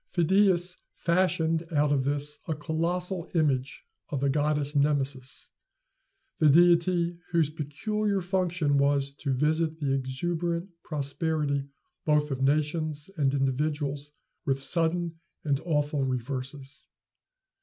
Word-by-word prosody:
Phidias 180 0 +3 0.2
fashioned 170 -2 +1
out 150 -2 +2
of 135 -2 +1
this 145 +1 -1
a 160 - -1
colossal 170 +3 -2
image 140 -5 0 0.3
of 145 - -2
the 140 0 +1
goddess 150 0 0
Nemesis, 140 -3 0 0.9
the 155 - +6
deity 170 +2 +4
whose 160 -3 +2
peculiar 200 +8 -1
function 180 -5 +1
was 140 0 +2
to 140 -1 -3
visit 155 +4 +1
the 140 -3 0
exuberant 170 +7 -2
prosperity 145 -1 -1 0.4
both 150 -1 +2
of 135 -1 -3
nations 150 +3 0
and 140 -5 +2
individuals 145 +1 -1 0.3
with 135 0 0
sudden 165 0 +2 0.2
and 140 -3 +1
awful 150 -3 0
reverses. 130 +2 -4
150 Hz, 110 wpm, -28 LUFS, 140-170 Hz, 0.9 s, the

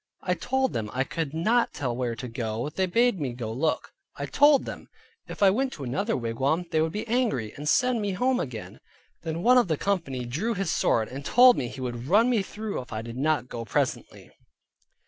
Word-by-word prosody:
I 180 - +1
told 265 +7 -1
them, 105 -2 -3
I 130 +1 +1
could 155 +1 -4
not 215 +10 +1
tell 125 -5 -2
where 120 -2 -2
to 125 - -6
go, 115 +2 -3
they 185 +4 -1
bade 235 +2 +2
me 135 -5 -2
go 115 -2 -5
look; 155 +7 -1 0.2
I - - -4
told 290 -1 +4
them, - - -8 0.4
if - - -3
I 195 - +7
went 260 +6 -1
to 145 - -8
another 190 - -1
wigwam 135 +8 -1
they 160 -2 +2
would 160 0 0
be 210 +5 -4
angry, 220 - 0
and 150 +1 -3
send 250 -3 +2
me 200 -2 -1
home 250 +6 +1
again. 120 -6 -6 0.4
Then 165 +1 -4
one 250 +1 +6
of 240 - +1
the 160 -3 0
company 150 -11 -2
drew 175 - -2
his 190 -3 -1
sword, 110 -1 +1
and 135 +2 -7
told 245 - +6
me 125 - -2
he 130 +2 -8
would 120 0 -4
run 220 - +4
me 230 -4 +2
through 210 -3 -5
if 125 - -14
I 110 0 -4
did 115 0 -8
not 150 -1 +1
go 115 -2 -6
presently. 115 - -3
160 Hz, 220 wpm, -26 LUFS, -, 0.4 s, I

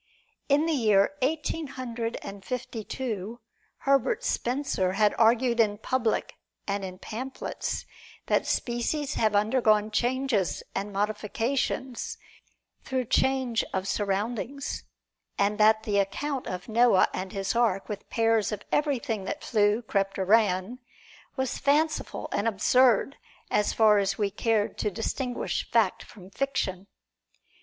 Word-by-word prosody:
In 290 +3 +4
the 330 - +1
year 215 -2 +3
Eighteen 310 +3 -1
Hundred 235 -3 -4 0.3
Fifty 240 -2 -4
two, 225 -2 -4 0.4
Herbert 275 - +2
Spencer 245 - 0
had 210 +1 +3
argued 235 +1 +4
in 210 -2 +3
public 235 0 -1 0.3
and 200 0 -2
in 185 -1 -6
pamphlets 245 +7 -5 0.4
that - - +1
species 270 +5 -1
have 215 -2 +1
undergone 215 0 +3
changes 240 - 0
and 205 +1 -3
modifications 220 +5 -2 0.6
through 260 -1 -2
change 260 -1 +1
of 190 0 -1
surroundings, 220 +8 -2 0.5
and 205 +1 +1
that 220 +1 +5
the 205 -2 +1
account 265 +7 -2
of 180 0 -5
Noah 230 -3 +4
and 185 0 -4
his 195 +2 -2
ark, 225 -5 +1
with 205 -2 -7
pairs 225 -2 +2
of 210 -1 -4
everything 270 -8 0
that 300 - -4
flew, 210 0 +2
crept 195 -3 -1
or 190 - -1
ran, 205 +2 +2 0.6
was 265 -2 -2
fanciful 305 +3 +1
and 205 - 0
absurd, 250 +4 +3 0.3
so - - +4
far 215 -2 +5
as 195 0 0
we 205 -2 0
cared 215 0 0
to 210 - +1
distinguish 245 +4 -3
fact 225 -5 +2
from 190 -3 -14
fiction. 195 -8 -2
225 Hz, 130 wpm, -27 LUFS, 205-260 Hz, 0.6 s, that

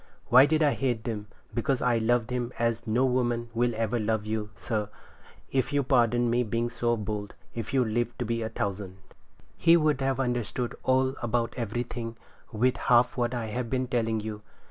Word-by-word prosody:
Why 130 +4 +8
did 155 +1 +2
I 145 - +4
hate 120 -5 -1
them? 105 -3 -4 0.3
Because 125 +2 0
I 120 -2 +2
loved 115 +1 +1
him 125 -1 -2
as 115 0 -1
no 120 +4 +2
woman 120 -2 0
will 120 0 +1
ever 115 +1 0
love 110 -1 0
you, 110 -1 -2
sir, 105 +3 -2 0.6
if 130 0 0
you'll 145 -1 +2
pardon 120 -2 +3
me 120 +1 +2
being 120 +1 -1
so 120 -1 0
bold, 105 -1 -4 0.2
if 115 - -5
you 130 -2 +3
live 120 +1 -1
to 120 - -2
be 115 +1 -1
a 110 - -2
thousand. 95 -2 -4 0.6
He 170 0 +5
would 150 -4 +2
have 135 -1 0
understood 120 -1 -1
all 130 0 +2
about 120 0 0
everything 115 0 -4 0.3
with 125 +3 +1
half 120 0 +3
what 120 0 0
I 120 -2 -2
have 125 -1 -2
been 130 0 0
telling 115 -3 0
you. 105 0 -5
120 Hz, 190 wpm, -28 LUFS, 110-125 Hz, 0.6 s, Why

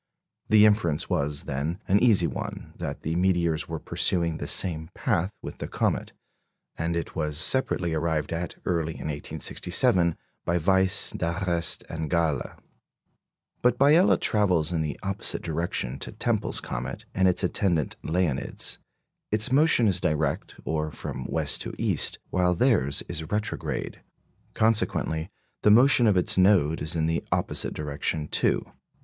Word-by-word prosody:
The 110 -1 +6
inference 105 -8 +1
was, 70 0 0
then, 75 +6 -3
an 100 +2 +4
easy 105 -7 +4
one, - - -6
that - - -6
the 80 - -2
meteors 85 -3 +1
were 80 - -3
pursuing 85 0 0
the - - -5
same 80 -3 +2
path 90 +3 0
with - - -8
the - - -4
comet; - - -1 0.6
and 85 +1 -2
it 85 - -4
was 75 -2 -2
separately 90 - +1
arrived 80 -1 -1
at, 85 +1 -4
early 80 -2 -1
in 75 - -6
1867, 85 - +1 0.3
by 85 - 0
Weiss, 95 +2 +3
D'Arrest, 85 -1 -1
and 80 -1 -5
Galle. 80 -6 0 1.1
But 125 0 +2
Biela 150 +8 +5
travels 90 -7 +1
in 80 - 0
the 75 -2 -4
opposite 95 -1 0
direction 75 -6 -3
to - - -5
Tempel's - - -1
comet - - -5
and 95 0 +2
its 90 - +1
attendant 85 -5 0
"Leonids"; 80 -5 -1 0.5
its 110 +4 +2
motion 140 -4 +4
is 95 - +1
direct, 75 0 -1
or 80 -1 -1
from - - -6
west - - -1
to - - -5
east, - - 0
while 90 -1 +2
theirs 85 - +2
is 80 -2 -3
retrograde. 105 +1 -3 0.5
Consequently, 105 -7 0 0.3
the - - +4
motion 120 +2 +6
of 100 -3 +3
its 90 - +3
node 90 -5 +3
is 80 +2 -1
in 80 -1 0
the 80 +1 -1
opposite - - -1
direction 75 +1 -2
too. - - 0
85 Hz, 145 wpm, -26 LUFS, 80-100 Hz, 1.1 s, The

